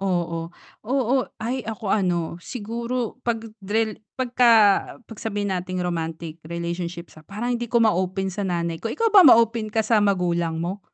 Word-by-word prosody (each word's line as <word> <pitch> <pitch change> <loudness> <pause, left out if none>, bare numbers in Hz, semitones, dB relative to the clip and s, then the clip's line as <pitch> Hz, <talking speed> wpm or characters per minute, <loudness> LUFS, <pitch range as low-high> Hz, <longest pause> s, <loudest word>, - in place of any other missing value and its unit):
oo. 170 -3 -1 0.4
Oo, 260 0 +1 0.3
ay, 250 +3 -2
ako 220 0 -6
ano, 175 -4 0
siguro 235 +6 -4
'pag 230 -2 -2 0.2
drel 215 +2 -1 0.2
pagka 250 -2 +3 0.5
'pag 225 - -12
sabihin 205 -3 -2
nating 185 0 -3
romantic 165 -1 -4
relationships, 170 0 -5
ah, - - -22
parang 235 +5 -3
hindi 240 0 -4
ko 235 +1 +3
ma-open 190 -2 +1
sa 200 +1 -3
nanay 170 -2 -2
ko, 225 - -3
ikaw 455 - 0
ba 400 - +9
ma-open 230 -3 +5
ka 220 0 0
sa 220 -1 +3
magulang 175 -5 +1
mo, 190 +4 -4
200 Hz, 160 wpm, -23 LUFS, 175-230 Hz, 0.5 s, ba